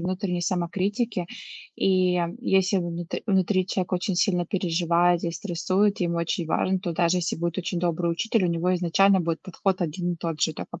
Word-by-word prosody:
внутренней 180 0 -2
самокритики. 185 +3 -1 0.5
И, 185 -1 +2
м, 170 0 -1
если 195 -4 +2
внутр 175 0 -4
внутри 190 -2 +2
человек 185 -1 -2
очень 185 +2 0
сильно 180 -2 +1
переживает 175 -1 +1
и 170 - 0
стрессует, 190 +3 0
ему 170 -1 0
очень 170 0 -1
важно, 190 +3 +1
то 175 - -3
даже 170 +2 +2
если 175 - -2
будет 170 +2 -2
очень 180 0 -2
добрый 170 0 0
учитель, 225 +4 0
у 175 - +2
него 170 +2 +1
изначально 185 +2 +3
будет 165 -1 -2
подход 185 0 -1
один 175 +2 -2
и - - -5
тот 165 -2 -4
же. 160 - +1
Такой 170 - -8
180 Hz, 185 wpm, -25 LUFS, 170-190 Hz, 0.5 s, изначально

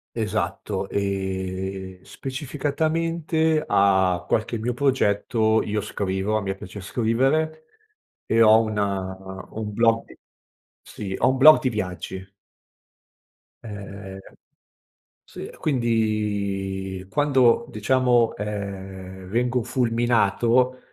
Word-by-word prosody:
Esatto, 105 -3 -2
ehm, 95 -1 -3
specificatamente 155 +3 -1
a 95 - +3
qualche 115 +1 0
mio 120 +3 -2
progetto 110 -4 +2
io 105 0 -2
scrivo, 100 0 -2
a 110 - 0
me 95 0 -3
piace 95 +2 -9
scrivere, 135 +10 0 0.6
e 115 0 +4
ho 110 0 +7
un 110 -2 -2
un 95 +1 -4
blog. 115 +1 +1 0.7
Sì, 95 -2 -7
ho 130 - +3
un 130 - +1
blog 155 +4 +8
di 130 - +1
viaggi. 95 -2 -5 1.3
Ehm, 100 -3 -8 1.1
sì, - - -9
e - - -11
quindi 100 -7 -1
quando, 130 -3 +3
diciamo, 120 +1 +2
ehm, 95 -2 -6
vengo 120 +4 0
fulminato, 120 0 +2
110 Hz, 95 wpm, -24 LUFS, 95-125 Hz, 1.3 s, blog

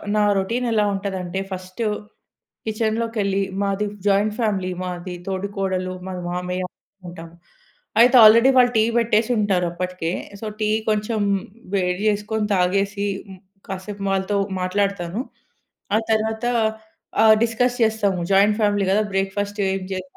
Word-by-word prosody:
నా 210 - +3
రొటీన్ 230 +6 -1
ఎలా 210 -2 +2
ఉంటది 195 -1 -3
అంటే 180 +2 -4
ఫస్ట్ 185 +3 -7 0.8
కిచెన్‌లోకెళ్లి 220 -2 -1 0.2
మాది 200 +1 0 0.2
జాయింట్ 205 +2 +3
ఫ్యామిలీ 195 -5 0
మాది 180 0 -5
తోడికోడలు, 190 -1 -2
మా 190 - -5 0.2
మామయ్య 180 +1 -3 0.4
ఉంటాం. 165 -1 -9 0.7
అయితే 250 +2 +6
ఆల్రెడీ 230 +4 +8
వాళ్ళు 245 -1 +6
టీ 220 - +5
పెట్టేసుంటారప్పటికే. 185 -7 0 0.3
సో, 220 - -7
టీ 215 0 +1 0.2
కొంచెం 215 +1 0 0.6
వేడి 180 0 0
చేసుకొని 210 +1 -1
తాగేసి, 195 +3 +1 0.6
కాసేపు 195 +1 -6
వాళ్ళతో 195 +1 0 0.2
మాట్లాడతాను. 200 +1 -1 0.7
ఆ - - +5
తరువాత 220 +1 0 0.8
ఆహ్, 220 0 +8
డిస్కస్ 245 +2 +1
చేస్తాము, 205 -4 +1
జాయింట్ 205 +2 +4
ఫ్యామిలీ 205 -2 +2
కదా! 210 +2 +3
బ్రేక్‌ఫాస్ట్ 200 +2 -2
ఏం 195 0 -2
జేయాలి, 185 0 -5
200 Hz, 120 wpm, -22 LUFS, 185-215 Hz, 0.8 s, ఆల్రెడీ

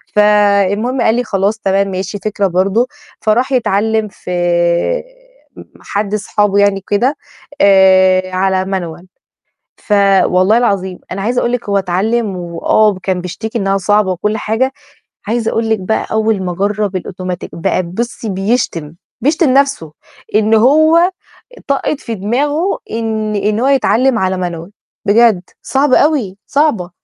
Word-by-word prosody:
فالمهم 210 +3 +2
قال 220 -1 +3
لي: 245 - 0
"خلاص، 200 +1 0
تمام 195 -1 +1
ماشي، 190 +2 -4
فكرة 205 -1 -1
برضه." 195 +7 +1 0.3
فراح 240 +5 +1
يتعلِّم 220 -3 +1
في 180 - -9 1.3
م - - -9 0.2
حد 205 0 -3
أصحابه 205 -1 0
يعني 200 -1 +2
كده، 255 +8 +1 0.4
آآ، 190 -1 +4
على 190 0 +1
Manual. 175 -3 -5 0.7
ف 210 - -7 0.3
والله 185 +5 +3
العظيم، 190 -6 -1
أنا 195 +1 -4
عايزة 240 +4 0
أقول 240 - -1
لِك 245 -3 -3
هو 200 -1 +2
اتعلِّم 195 +3 -1
وآه 180 +4 +1
كان 185 -2 -1
بيشتكي 220 +6 -5
إنّها 195 -2 0
صعبة 205 0 +1
وكل 210 +4 -2
حاجة، 230 +6 -1 0.6
عايزة 225 0 -1
أقول 225 0 -1
لِك 220 -1 +1
بقى 190 +4 -2
أول 220 -2 0
ما 180 - -2
جرّب 200 +1 -1
الأوتوماتيك 185 -1 -5
بقى 185 +2 -1
بُصّي 225 +6 -5
بيشتم، 190 -6 -2 0.3
بيشتم 310 +2 +2
نَفْسه 275 - +1 0.4
إنه 220 +1 +3
هو 315 - +4 0.6
طقّة 280 +2 0
في 230 -4 -6
دماغه 290 - -1
إن 220 -1 -2
إن 210 +1 0
هو 255 - +1
يتعلِّم 265 -2 +2
على 190 0 0
Manual 170 +1 -8 0.4
بجد، 215 -2 +4 0.2
صعبة 270 -1 +2
أوي، 260 -11 +1
صعبة. 275 - +1
210 Hz, 140 wpm, -14 LUFS, 190-235 Hz, 1.3 s, آآ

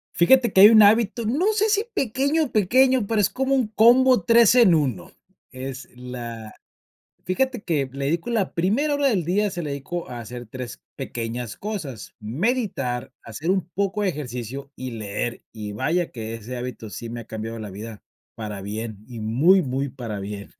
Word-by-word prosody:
Fíjate 240 +5 +4
que 190 - +6
hay 205 - +11
un 220 -1 +8
hábito, 225 +2 +3
no 325 - +1
sé 430 +1 +2
si 415 +1 +2
pequeño 280 - 0
pequeño, 255 +3 +3
pero 225 0 +1
es 200 - +2
como 265 +1 0
un 255 -4 +1
combo 245 +2 +5
3 230 +2 +6
en 235 -9 +6
1, 130 - -1 0.4
es 130 0 -7
la 120 -3 -7 0.7
fíjate 245 +6 -1
que 145 -6 -1
le 140 0 -4
dedico 165 +9 -1
la 220 -5 0
primera 230 - +1
hora 285 -1 +2
del 195 -9 +1
día, 200 +5 +1
se 175 -2 -5
la 150 - -4
dedico 140 +5 -5
a 120 -1 -6
hacer 120 +2 -8
3 125 +2 -8
pequeñas 120 -3 -5
cosas: 170 - -6
meditar, 135 - -2
hacer 145 +10 -3
un 190 -2 0
poco 200 +1 -1
de 195 - +2
ejercicio 135 -2 -6
y 130 -1 -6
leer, 110 +2 -4
y 105 -2 -6
vaya 165 +11 -1
que 115 -2 -6
ese 115 +3 -7
hábito 120 -3 -6
sí 115 +2 -7
me 120 0 -5
ha - - -10
cambiado 110 +1 -6
la 105 -2 -7
vida 105 +2 -9 0.3
para 105 -3 -6
bien 105 +1 -6
y 120 -2 -8
muy, 140 - +4
muy 135 0 -2
para 120 -6 -6
bien. 100 0 -7
145 Hz, 185 wpm, -23 LUFS, -, 0.7 s, hay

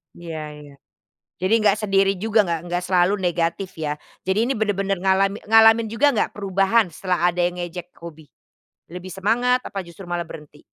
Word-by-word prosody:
Iya 165 -2 -7 0.2
iya, 145 -1 -13 0.7
jadi 190 +4 +1
nggak 205 -1 +3
sendiri 195 0 +3
juga 225 0 +2
nggak 170 -2 -1
nggak 175 +1 -2
selalu 180 +1 +3
negatif 175 +1 -1
ya. 150 -2 -2 0.3
Jadi 190 +2 0
ini - - +2
benar-benar 195 -2 0
ngalami 195 +1 +2
ngalamin 225 0 +6
juga 290 +5 +3
nggak - - 0
perubahan 195 +2 +2
setelah 180 +1 0
ada 175 - -5
yang 175 0 -2
ngejek 175 0 -7
hobi? 160 -2 -10 0.7
Lebih 180 +1 -8
semangat 245 +5 +1
apa 195 - -6
justru 170 +3 -12
malah 175 -1 -3
berhenti? 150 -2 -12
190 Hz, 170 wpm, -22 LUFS, 175-205 Hz, 0.7 s, ngalamin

